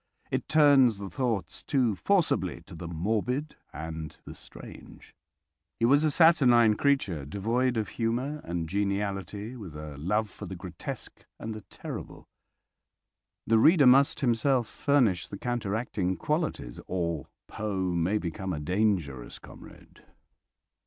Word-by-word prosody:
It - - -2
turns 140 -7 +5
the 100 -2 -7
thoughts 110 -10 -2
too 125 -6 +1
forcibly 95 - +1
to 85 - -14
the 85 0 -7
morbid 110 - -2 0.2
and 80 +1 -7
the - - -8
strange. - - -12 0.7
He 115 - +3
was 140 +5 +5
a 155 - +3
saturnine 130 -9 +5
creature, 105 - +1
devoid 115 - 0
of 110 - -1
humour 125 +6 -2
and 85 -1 -3
geniality, 100 +2 -2
with 95 -10 -9
a 75 -2 -8
love 105 +8 0
for 100 - -9
the 95 - -6
grotesque 90 -2 -7
and 110 - -5
the 110 - -8
terrible. - - -8 1.2
The 115 0 +4
reader 155 +3 +6
must 135 +2 +5
himself 125 0 +2
furnish 125 - +1
the 100 - -7
counteracting 105 -5 -2
qualities 150 - -2
or 85 -5 -2 0.2
Poe 95 -4 -2
may 85 +5 +1
become 95 0 -4
a 75 - -3
dangerous 85 - -1
comrade. - - -15
105 Hz, 130 wpm, -28 LUFS, 90-125 Hz, 1.2 s, reader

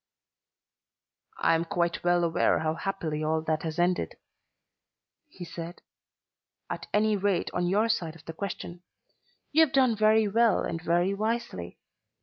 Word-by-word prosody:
"I - - +3
am 165 0 +2
quite 170 0 -1
well 175 0 +3
aware 165 -1 +2
how 155 0 0
happily 160 -4 -3
all 155 +1 0
that 155 -1 -1
has 160 0 -4
ended," 175 +1 0 1.1
he 190 -12 -10
said; 170 +1 -8 0.9
"at - - -5
any 215 0 +3
rate 200 -2 0
on 175 0 0
your 210 +4 +2
side 170 -8 -1
of 165 -1 -16
the 165 - -6
question. 175 -1 -6 0.7
You 320 +2 +6
have 310 - 0
done 255 -4 +4
very 215 0 +4
well 225 0 +3
and 165 -1 -3
very 175 +3 +1
wisely. 215 - -3
175 Hz, 145 wpm, -28 LUFS, 165-215 Hz, 1.1 s, You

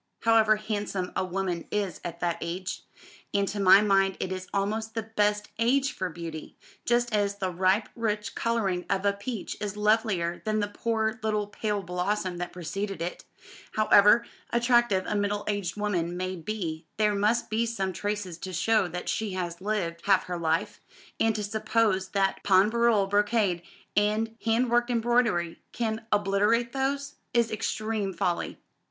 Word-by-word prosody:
However 225 -1 +5
handsome 205 -3 -3
a - - +1
woman 185 -2 -2
is 205 -3 -2
at 170 -1 -6
that 170 -1 0
age 180 +2 -4 0.5
and 200 0 +2
to 205 - -4
my 195 +1 +7
mind 195 -2 +3
it 185 - -3
is 185 0 -4
almost 220 +3 -2
the 225 - -1
best 210 -1 0
age 260 +4 +3
for 185 -1 -3
beauty, 165 -2 -8 0.3
just 240 -1 +1
as 200 -1 +1
the 190 -2 -2
ripe 185 +4 +2
rich 210 -2 -2
colouring 200 -6 0
of 195 0 0
a 200 - +3
peach 200 +2 -5
is 210 -1 -3
lovelier 210 -5 +1
than 215 -1 0
the 205 - 0
poor 220 +2 -1
little 215 -1 0
pale 205 0 -2
blossom 180 +1 -2
that 175 0 -4
preceded 195 +3 -4
it 170 +2 -5 0.5
however 215 +2 +6 0.2
attractive 235 -5 +3
a - - -2
middle 205 0 0
aged 205 -5 -1
woman 175 -5 -1
may 185 +1 -2
be 165 -3 -4
there 210 0 +3
must 215 +4 +1
be 230 +2 +1
some 195 -5 -2
traces 205 -3 -3
to 185 - -6
show 210 +3 +2
that 180 +1 -6
she 220 -3 -1
has 175 -1 -4
lived 185 -5 -2
half 190 -2 +5
her 180 -1 -4
life; 160 0 0 0.4
and 225 -1 +3
to 210 - -2
suppose 210 -2 +1
that 195 -1 0
pain 195 +1 +5
brûlé 235 -4 +3
brocade, 205 -3 +2 0.3
and 215 +2 +1
hand 230 +2 +2
worked 240 +1 +3
embroidery, 235 -8 +1
can 225 -1 -2
obliterate 210 +4 +2
those, 280 +1 -2 0.2
is 235 -1 +3
extreme 215 -1 -2
folly. 175 -1 -2
205 Hz, 165 wpm, -27 LUFS, 185-220 Hz, 0.5 s, my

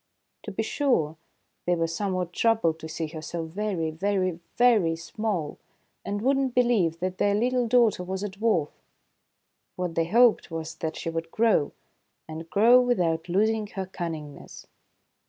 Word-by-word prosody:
To - - -5
be - - -2
sure, 205 - 0 0.5
they 175 - +3
were 165 -1 0
somewhat 180 +1 -2
troubled 215 -9 +2
to 160 - -7
see 160 +1 -3
her 160 0 -7
so 165 +1 -4
very, 175 -2 -2
very, 185 0 -1 0.2
very 220 -9 +4
small, 170 -2 -4 0.4
and 205 +1 -3
would 270 +2 +3
not 265 -2 -1
believe 215 -10 +2
that 185 0 -3
their 205 0 +3
little 245 +2 +1
daughter 230 -5 +3
was 190 +2 -4
a 205 - -2
dwarf. 195 -6 0 1.0
What 180 -2 -3
they 165 0 +1
hoped 235 +4 +4
was 165 -1 -5
that 160 -1 -3
she 165 - -4
would 165 0 -4
grow, 215 -8 +2 0.6
and 160 +1 -8
grow 235 +6 +6
without 175 -9 0
losing 215 +3 +1
her 195 -2 -5
cunningness. 165 -5 -7
185 Hz, 155 wpm, -26 LUFS, 165-220 Hz, 1.0 s, grow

